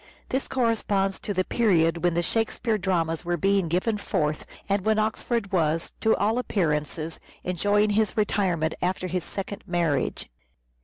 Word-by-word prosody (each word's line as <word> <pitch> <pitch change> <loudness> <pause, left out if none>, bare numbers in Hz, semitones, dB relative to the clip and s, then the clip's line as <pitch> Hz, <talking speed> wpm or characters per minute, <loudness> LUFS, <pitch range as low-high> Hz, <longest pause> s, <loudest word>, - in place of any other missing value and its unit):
This 265 +1 -1
corresponds 210 -6 0
to - - -4
the 185 -2 +1
period 170 -7 +2
when 175 -1 +2
the 175 - +1
Shakespeare 225 +1 0
dramas 170 -4 0
were 175 0 -1
being 195 +1 +2
given 185 +6 0
forth, 150 -5 -1 0.2
and 200 -1 +1
when 220 +1 +2
Oxford 215 0 -1
was, 165 -2 0
to 220 - +4
all 220 +4 +1
appearances, 160 - -1 0.2
enjoying 205 +4 +2
his 215 +1 +1
retirement 185 -6 +1
after 185 +1 -1
his 180 -1 -2
second 200 0 -5
marriage. 170 -6 0
190 Hz, 150 wpm, -26 LUFS, 170-215 Hz, 0.2 s, to